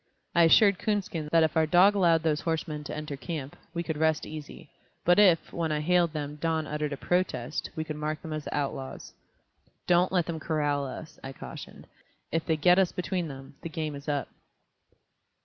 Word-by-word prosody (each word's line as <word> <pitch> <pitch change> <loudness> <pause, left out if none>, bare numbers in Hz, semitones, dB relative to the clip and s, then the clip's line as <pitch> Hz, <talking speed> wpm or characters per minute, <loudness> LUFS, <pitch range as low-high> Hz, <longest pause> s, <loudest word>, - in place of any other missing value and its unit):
I 170 -1 +6
assured 200 +3 +6
Coonskin 200 -7 -2
that 165 -1 +5
if 160 - 0
our 160 -1 +3
dog 180 +5 +6
allowed 170 -5 +3
those 155 -2 +1
horsemen 155 -2 -2
to - - -5
enter 150 -2 -5
camp, 145 -2 -6 0.2
we 170 -1 -3
could 160 -2 -3
rest 160 -1 +2
easy, 155 -1 -9 0.3
but 175 +3 +5
if, 185 -6 +4
when 165 -2 -1
I 150 - 0
hailed 175 +1 +3
them, 150 -1 -5
Don 160 0 0
uttered 150 0 -3
a 140 - -3
protest, 180 +5 -1
we 160 - -2
could 155 -1 -5
mark 150 0 -2
them 160 - -5
as 155 -1 -4
the - - -3
outlaws. 135 -2 -4 0.7
"Don't 175 +1 +3
let 180 -3 +2
them 165 -2 -4
corral 145 -3 0
us," 155 +4 -9
I 135 0 -6
cautioned; - - -10 0.5
"if 165 +1 0
they 160 - +2
get 180 +5 +5
us 190 -2 +3
between 180 -1 -2
them, 135 -2 -9
the 165 - -5
game 155 -1 -3
is 140 +1 -7
up." 145 -2 -1
160 Hz, 200 wpm, -28 LUFS, 150-170 Hz, 0.7 s, I